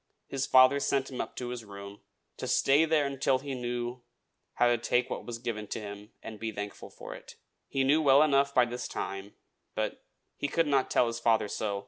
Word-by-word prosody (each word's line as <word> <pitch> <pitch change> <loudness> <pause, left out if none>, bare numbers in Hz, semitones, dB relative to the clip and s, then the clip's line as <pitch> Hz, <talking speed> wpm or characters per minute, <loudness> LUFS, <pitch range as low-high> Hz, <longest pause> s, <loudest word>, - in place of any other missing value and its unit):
his 135 -1 -2
father 130 +2 +6
sent 135 -1 0
him 125 - -3
up - - -7
to 125 -1 -4
his 125 -2 -5
room, 100 -1 -10 0.3
"to - - -5
stay 145 +4 +4
there 155 -2 +2
until 135 -1 +1
he 140 +1 -6
knew 120 0 -3 0.5
how - - +3
to 120 0 +4
take 120 +2 0
what - - -5
was 120 -1 -4
given 115 -3 -4
him, 105 0 -6
and 110 -2 -8
be 115 -1 -3
thankful 100 0 -7
for - - -9
it." - - -12 0.3
He 135 - 0
knew 145 +4 +4
well 140 0 +6
enough 140 -2 +3
by 125 -3 +4
this 120 +1 -5
time; 100 +1 -5 0.4
but - - -3 0.3
he 145 - -2
could 165 +3 +1
not 140 -3 +2
tell - - +3
his 115 0 -3
father 115 -2 +2
so. 100 -1 -2
125 Hz, 205 wpm, -30 LUFS, 110-135 Hz, 0.5 s, father